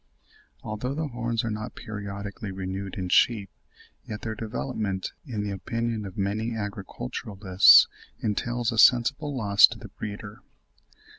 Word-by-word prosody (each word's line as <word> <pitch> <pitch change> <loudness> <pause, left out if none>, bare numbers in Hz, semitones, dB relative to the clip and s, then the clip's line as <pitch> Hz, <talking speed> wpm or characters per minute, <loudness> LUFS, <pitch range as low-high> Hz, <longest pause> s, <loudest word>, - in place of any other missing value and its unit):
Although 115 +5 -4
the 155 -1 -2
horns 120 -2 -2
are 115 - -2
not 105 0 -5
periodically 100 -1 -6
renewed 95 0 -5
in 95 -2 -3
sheep, 105 0 +3 0.5
yet 105 0 -7
their 110 - -3
development, 105 -3 -3 0.2
in 110 -5 -3
the 105 - -3
opinion 115 +2 -3
of 95 - -11
many 105 +4 -1
agriculturists, 100 - +4 0.3
entails 120 +3 -1
a 115 - -1
sensible 135 +6 +4
loss 100 -4 +7
to - - -8
the - - -11
breeder. 105 0 -8
105 Hz, 135 wpm, -26 LUFS, 100-115 Hz, 0.5 s, loss